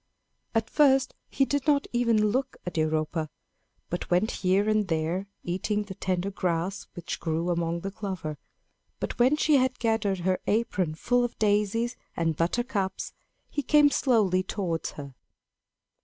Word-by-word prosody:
At 225 Hz, 0 st, +2 dB
first 270 Hz, -3 st, +4 dB, 0.2 s
he 270 Hz, -, +2 dB
did 285 Hz, +1 st, -1 dB
not 285 Hz, -2 st, +3 dB
even 230 Hz, -3 st, +3 dB
look 260 Hz, +2 st, -1 dB
at 180 Hz, -, -5 dB
Europa, 155 Hz, 0 st, 0 dB, 0.6 s
but 175 Hz, -, -3 dB
went 180 Hz, +5 st, +2 dB
here 190 Hz, +2 st, +1 dB
and 215 Hz, -2 st, +2 dB
there, 165 Hz, +3 st, -1 dB, 0.2 s
eating 205 Hz, +4 st, -1 dB
the 200 Hz, -2 st, -8 dB
tender 185 Hz, +1 st, -2 dB
grass 185 Hz, +1 st, -2 dB
which 175 Hz, -, -5 dB
grew 165 Hz, +2 st, -1 dB
among 170 Hz, 0 st, -1 dB
the 195 Hz, -, -4 dB
clover. 185 Hz, -7 st, -5 dB, 0.6 s
But -, -, -4 dB
when 255 Hz, +5 st, +5 dB
she 305 Hz, -1 st, +4 dB
had 255 Hz, -1 st, +1 dB
gathered 210 Hz, -5 st, 0 dB
her 185 Hz, +1 st, +1 dB
apron 190 Hz, -7 st, 0 dB
full 245 Hz, +9 st, +2 dB
of 240 Hz, -, -3 dB
daisies 210 Hz, +3 st, +1 dB, 0.2 s
and 165 Hz, -2 st, +1 dB
buttercups, 195 Hz, -, -1 dB, 0.3 s
he 290 Hz, -, -2 dB
came 290 Hz, +1 st, +5 dB
slowly 210 Hz, -11 st, +3 dB
towards 185 Hz, -4 st, -3 dB
her. 140 Hz, -2 st, -8 dB
200 Hz, 150 wpm, -27 LUFS, 175-235 Hz, 0.6 s, when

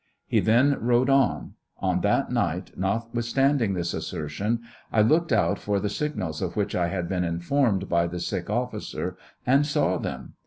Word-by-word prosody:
He -, -, +2 dB
then 130 Hz, +6 st, +3 dB
rode 125 Hz, +3 st, +3 dB
on. 135 Hz, -2 st, +2 dB, 0.2 s
On -, -, 0 dB
that -, -, +1 dB
night, -, -, -1 dB
notwithstanding 115 Hz, +3 st, 0 dB
this 85 Hz, -1 st, -2 dB
assertion, 80 Hz, +8 st, -2 dB, 0.3 s
I 110 Hz, -, +4 dB
looked 160 Hz, +8 st, +3 dB
out 100 Hz, -7 st, +2 dB
for 100 Hz, -1 st, 0 dB
the 105 Hz, +1 st, -1 dB
signals 100 Hz, -, -3 dB
of 90 Hz, -2 st, -3 dB
which 105 Hz, -2 st, -1 dB
I 85 Hz, -1 st, +1 dB
had 85 Hz, 0 st, -2 dB
been 90 Hz, -1 st, -1 dB
informed 95 Hz, +4 st, +1 dB
by 85 Hz, 0 st, +2 dB
the 90 Hz, +1 st, -5 dB
sick 85 Hz, +1 st, -3 dB
officer, 120 Hz, 0 st, -3 dB, 0.3 s
and 135 Hz, +3 st, +4 dB
saw 145 Hz, 0 st, +1 dB
them. -, -, -6 dB
105 Hz, 165 wpm, -26 LUFS, 90-125 Hz, 0.3 s, I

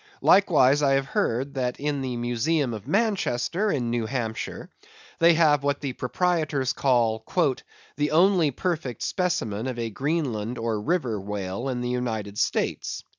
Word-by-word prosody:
Likewise, 150 Hz, -8 st, +5 dB
I 140 Hz, -2 st, +3 dB
have 135 Hz, 0 st, +2 dB
heard 130 Hz, +2 st, -1 dB
that 125 Hz, -2 st, -2 dB
in 145 Hz, -1 st, -1 dB
the 125 Hz, -2 st, -3 dB
museum 120 Hz, +3 st, 0 dB
of 105 Hz, -2 st, -8 dB
Manchester, 200 Hz, -, 0 dB
in 120 Hz, -5 st, -1 dB
New 120 Hz, -2 st, -1 dB
Hampshire, 115 Hz, -2 st, -4 dB, 0.5 s
they 170 Hz, 0 st, +6 dB
have 150 Hz, -3 st, +4 dB
what 140 Hz, 0 st, 0 dB
the 140 Hz, -3 st, -4 dB
proprietors 155 Hz, -1 st, 0 dB
call 115 Hz, -4 st, +1 dB, 0.7 s
"the 150 Hz, 0 st, +1 dB
only 175 Hz, -1 st, +4 dB
perfect 145 Hz, -, -3 dB
specimen 125 Hz, -, -1 dB
of 130 Hz, -2 st, -4 dB
a 115 Hz, -1 st, -3 dB
Greenland 125 Hz, -4 st, -2 dB
or 115 Hz, -2 st, -2 dB
River 125 Hz, -, -1 dB
Whale 100 Hz, +4 st, -4 dB
in 125 Hz, -1 st, -2 dB
the 125 Hz, -, -2 dB
United 110 Hz, -5 st, -3 dB
States." -, -, -1 dB
130 Hz, 150 wpm, -25 LUFS, 115-155 Hz, 0.7 s, they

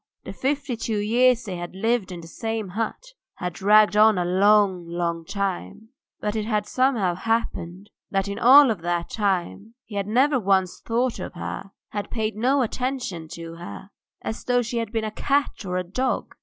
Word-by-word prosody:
The -, -, -7 dB
fifty 275 Hz, -1 st, -1 dB
two 225 Hz, -1 st, -2 dB
years 240 Hz, +4 st, +3 dB
they 190 Hz, -5 st, -5 dB
had 175 Hz, +1 st, -7 dB
lived 225 Hz, -1 st, 0 dB
in 175 Hz, -1 st, -7 dB
the 165 Hz, -, -11 dB
same 225 Hz, +3 st, -4 dB
hut 225 Hz, -, -4 dB, 0.2 s
had 180 Hz, -1 st, -4 dB
dragged 210 Hz, +3 st, +5 dB
on 215 Hz, -1 st, +6 dB
a 175 Hz, -, 0 dB
long, 190 Hz, -1 st, +3 dB
long 170 Hz, -1 st, -2 dB
time, 195 Hz, -, -4 dB, 0.3 s
but 210 Hz, +1 st, -2 dB
it 215 Hz, -1 st, -1 dB
had 210 Hz, -2 st, 0 dB
somehow 235 Hz, -7 st, +1 dB
happened 200 Hz, -2 st, -3 dB, 0.2 s
that 195 Hz, 0 st, 0 dB
in 200 Hz, -, -4 dB
all 265 Hz, 0 st, +8 dB
that 175 Hz, -2 st, -3 dB
time 200 Hz, +2 st, -2 dB
he 220 Hz, -, -13 dB
had 200 Hz, 0 st, -1 dB
never 260 Hz, +5 st, +3 dB
once 190 Hz, -3 st, +1 dB
thought 240 Hz, +1 st, -1 dB
of -, -, -6 dB
her, 185 Hz, -, -6 dB, 0.2 s
had 205 Hz, -1 st, -4 dB
paid 220 Hz, -2 st, -2 dB
no 260 Hz, +5 st, +2 dB
attention 245 Hz, -9 st, -3 dB
to 165 Hz, 0 st, -8 dB
her, 180 Hz, +3 st, -9 dB, 0.3 s
as 220 Hz, -, -4 dB
though 245 Hz, -1 st, +2 dB
she 235 Hz, +1 st, -2 dB
had 225 Hz, -2 st, -4 dB
been 225 Hz, -1 st, -1 dB
a 215 Hz, -, -3 dB
cat 280 Hz, +4 st, 0 dB
or 180 Hz, 0 st, -1 dB
a 185 Hz, -, -1 dB
dog. 255 Hz, +9 st, -2 dB
210 Hz, 185 wpm, -24 LUFS, 185-235 Hz, 0.3 s, all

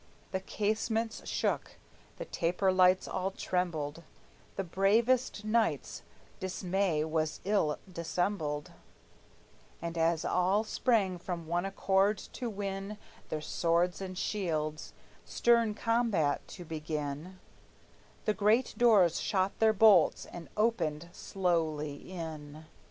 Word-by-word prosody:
The 190 Hz, -, -1 dB
casements 220 Hz, +3 st, -2 dB
shook, -, -, -1 dB, 0.4 s
the -, -, -5 dB
taper 180 Hz, +3 st, +1 dB
lights 185 Hz, 0 st, +4 dB
all 185 Hz, +1 st, -1 dB
trembled; 170 Hz, -5 st, -2 dB, 0.5 s
The 195 Hz, -, -2 dB
bravest 215 Hz, +6 st, +2 dB
knight's 225 Hz, +1 st, 0 dB, 0.4 s
dismay 185 Hz, -3 st, 0 dB
was 155 Hz, -1 st, -1 dB
ill 190 Hz, -7 st, +1 dB
dissembled; 170 Hz, -4 st, -2 dB, 1.1 s
And 170 Hz, 0 st, -4 dB
as 165 Hz, 0 st, +2 dB
all 190 Hz, +4 st, +2 dB
sprang 220 Hz, -4 st, +1 dB
with -, -, -14 dB
one 175 Hz, +1 st, -1 dB
accord 195 Hz, +1 st, +2 dB
to 245 Hz, +4 st, -6 dB
win 200 Hz, 0 st, -4 dB, 0.3 s
Their 155 Hz, -, -3 dB
swords 170 Hz, +3 st, +1 dB
and 185 Hz, -1 st, -6 dB
shields, 155 Hz, -7 st, -2 dB, 0.3 s
stern 235 Hz, -3 st, +2 dB
combat 225 Hz, -10 st, +1 dB
to 175 Hz, -, -9 dB
begin, 155 Hz, +2 st, -4 dB, 0.9 s
The 215 Hz, -, +2 dB
great 215 Hz, +5 st, +2 dB
doors 205 Hz, -8 st, +5 dB
shot 190 Hz, -1 st, 0 dB
their 220 Hz, -1 st, +5 dB
bolts, 205 Hz, -5 st, +5 dB
and 175 Hz, -1 st, -10 dB
opened 170 Hz, -8 st, 0 dB
slowly 160 Hz, -5 st, -2 dB
in. 155 Hz, -3 st, -7 dB
185 Hz, 110 wpm, -31 LUFS, 160-210 Hz, 1.1 s, doors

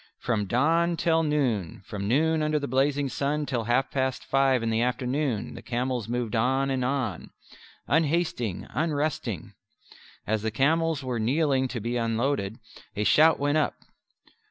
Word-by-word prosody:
From 110 Hz, -5 st, -1 dB
dawn 165 Hz, -, +2 dB
till 165 Hz, -1 st, +2 dB
noon, 125 Hz, -, -1 dB
from 100 Hz, -2 st, -5 dB
noon 160 Hz, +6 st, +2 dB
under 155 Hz, 0 st, +1 dB
the 140 Hz, -1 st, -2 dB
blazing 140 Hz, +2 st, +1 dB
sun 145 Hz, +3 st, -1 dB
till 120 Hz, -6 st, -2 dB
half 120 Hz, +3 st, +1 dB
past 130 Hz, -1 st, -1 dB
five 135 Hz, -3 st, +2 dB
in 115 Hz, -, 0 dB
the 110 Hz, +1 st, +1 dB
afternoon, 125 Hz, -1 st, -1 dB
the -, -, -9 dB
camels 125 Hz, -2 st, -2 dB
moved 120 Hz, -2 st, -2 dB
on 130 Hz, +4 st, +1 dB
and 130 Hz, -1 st, 0 dB
on, 125 Hz, -8 st, -2 dB, 0.6 s
"unhasting, 150 Hz, -, 0 dB
unresting." 150 Hz, -, -2 dB, 0.7 s
As 110 Hz, 0 st, 0 dB
the 110 Hz, -, -1 dB
camels 155 Hz, +5 st, +1 dB
were 125 Hz, -2 st, -2 dB
kneeling 135 Hz, +3 st, +1 dB
to 125 Hz, -2 st, -4 dB
be 120 Hz, +3 st, -2 dB
unloaded, 115 Hz, -2 st, -1 dB, 0.4 s
a 105 Hz, -, 0 dB
shout 155 Hz, +8 st, +5 dB
went 145 Hz, +2 st, +1 dB
up. 155 Hz, -, 0 dB
130 Hz, 155 wpm, -26 LUFS, 115-150 Hz, 0.7 s, shout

